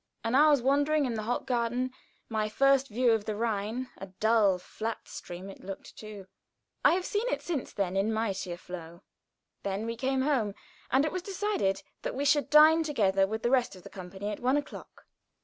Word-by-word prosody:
An 230 - -1
hour's 290 -1 +5
wandering 285 +2 +3
in 245 - -1
the 220 - -2
Hofgarten 245 +1 -1 0.4
my 215 -2 -1
first 275 +3 +3
view 240 +1 +2
of 220 -2 +1
the 215 - -2
Rhine 225 +3 -2
a 195 - -7
dull, 205 0 +3
flat 220 +5 -5
stream 180 +2 -8
it 195 - -11
looked, 195 0 -8
too. 210 -3 -9 0.6
I - - +6
have 365 0 -2
seen 420 +4 -1
it - - -2
since 315 -7 -3
then 190 -2 -2
in 200 +3 +1
mightier 195 -5 -2
flow. 170 -1 -9 0.6
Then 200 +2 -3
we 230 0 -3
came 260 +2 0
home, 240 -9 +1 0.3
and 265 +4 +3
it 310 - -1
was 365 - -3
decided 380 - -1 0.2
that - - -4
we 280 +2 -1
should 285 0 +3
dine 310 +2 +7
together 195 -11 +2
with 220 +2 -4
the 240 - +1
rest 250 -6 +2
of 185 - -14
the - - -11
company 190 +2 -6
at 205 - -5
one 255 +3 +2
o'clock. 290 - -7
230 Hz, 195 wpm, -29 LUFS, 200-275 Hz, 0.6 s, dine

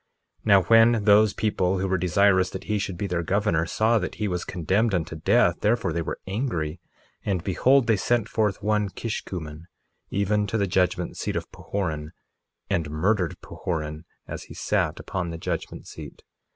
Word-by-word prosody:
1:9 - - -36
Now 100 -3 +6
when 115 0 +5
those 105 0 +5
people 95 -3 0
who 95 +1 -1
were 95 - +1
desirous 95 +1 +3
that - - -7
he 105 -1 -1
should 95 -2 -3
be 100 - -2
their 90 -3 -1
governor 85 -2 +1
saw 110 +5 +2
that 90 - -4
he 105 - -2
was 90 -2 -2
condemned 95 +6 0
unto 85 -1 -2
death, 80 - +3
therefore 105 -5 +1
they 85 - -1
were 80 - -4
angry, 95 - -2 0.4
and 95 -4 -1
behold, 130 +7 +3
they 110 -2 +3
sent 115 +1 +1
forth 105 -3 -1
one 105 -1 +1
Kishkumen, 85 -7 -6 0.4
even 105 +1 +1
to 110 - -1
the 100 - +2
judgment 90 -1 0
seat - - -3
of - - -4
Pahoran, 80 -5 -4 0.5
and 80 -4 -1
murdered 90 +3 0
Pahoran 80 -2 -4 0.2
as - - -6
he - - -12
sat - - 0
upon 90 -2 -3
the 85 - -5
judgment - - -4
seat. - - -10
95 Hz, 180 wpm, -25 LUFS, 85-105 Hz, 0.5 s, Now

